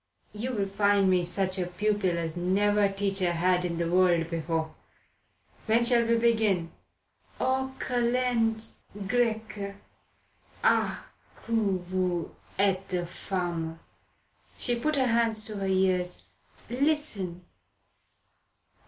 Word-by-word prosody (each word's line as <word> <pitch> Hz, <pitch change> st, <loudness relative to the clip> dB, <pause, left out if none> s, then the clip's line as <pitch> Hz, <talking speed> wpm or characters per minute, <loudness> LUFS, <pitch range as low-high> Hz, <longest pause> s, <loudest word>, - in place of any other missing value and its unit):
"You'll 215 Hz, -1 st, -2 dB
find 200 Hz, -1 st, +3 dB
me 180 Hz, -1 st, +3 dB
such 185 Hz, +2 st, -1 dB
a 180 Hz, -, -1 dB
pupil 195 Hz, -1 st, 0 dB
as 165 Hz, -1 st, -2 dB
never 200 Hz, +3 st, +2 dB
teacher 195 Hz, -2 st, 0 dB
had 180 Hz, +1 st, +2 dB
in 170 Hz, -2 st, -2 dB
the 170 Hz, 0 st, 0 dB
world 175 Hz, -2 st, +3 dB
before. 160 Hz, -1 st, -2 dB, 0.9 s
When 230 Hz, +2 st, +3 dB
shall 235 Hz, -1 st, +4 dB
we 230 Hz, 0 st, +3 dB
begin?" 220 Hz, -7 st, +2 dB, 0.7 s
"Aux 265 Hz, 0 st, 0 dB
Kalendes 235 Hz, -2 st, 0 dB, 0.3 s
Grecques." 220 Hz, -3 st, -1 dB, 0.9 s
"Ah -, -, +2 dB, 0.4 s
que 230 Hz, -, -5 dB, 0.3 s
vous 180 Hz, -2 st, -1 dB, 0.3 s
etes 190 Hz, -2 st, 0 dB
femme!" 170 Hz, -3 st, -3 dB, 0.8 s
She 245 Hz, -, +2 dB
put 305 Hz, +6 st, 0 dB
her 265 Hz, -2 st, +2 dB
hands 230 Hz, -2 st, +3 dB
to 215 Hz, -1 st, -6 dB
her 195 Hz, -1 st, -2 dB
ears. 185 Hz, -1 st, +1 dB, 0.4 s
"Listen. 240 Hz, -, -1 dB
195 Hz, 110 wpm, -28 LUFS, 180-230 Hz, 0.9 s, shall